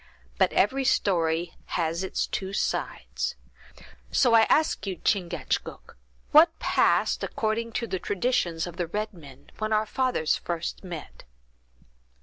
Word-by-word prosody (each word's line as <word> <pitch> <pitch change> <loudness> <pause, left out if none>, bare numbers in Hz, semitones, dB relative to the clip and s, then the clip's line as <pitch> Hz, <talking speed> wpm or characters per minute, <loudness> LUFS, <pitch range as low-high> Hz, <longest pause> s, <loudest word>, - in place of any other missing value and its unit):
But - - +4
every 265 +7 +2
story 170 -7 +1 0.2
has 165 +1 -1
its 190 - -1
two 190 0 -4
sides; - - -2 0.7
so 245 -3 +3
I 225 -1 +6
ask 310 -8 +2
you, 190 - -2
Chingachgook, 180 0 -2 0.4
what 315 +3 +6
passed, - - +2
according 225 +1 -2
to 235 - -1
the 190 -5 -3
traditions 180 -6 0
of 175 -1 -9
the 175 - -1
red 210 +5 -3
men, 140 -5 -15
when 215 0 -2
our 215 0 +2
fathers 250 -9 0
first 170 +2 -4
met?" 170 - -9
195 Hz, 135 wpm, -26 LUFS, 170-225 Hz, 0.7 s, I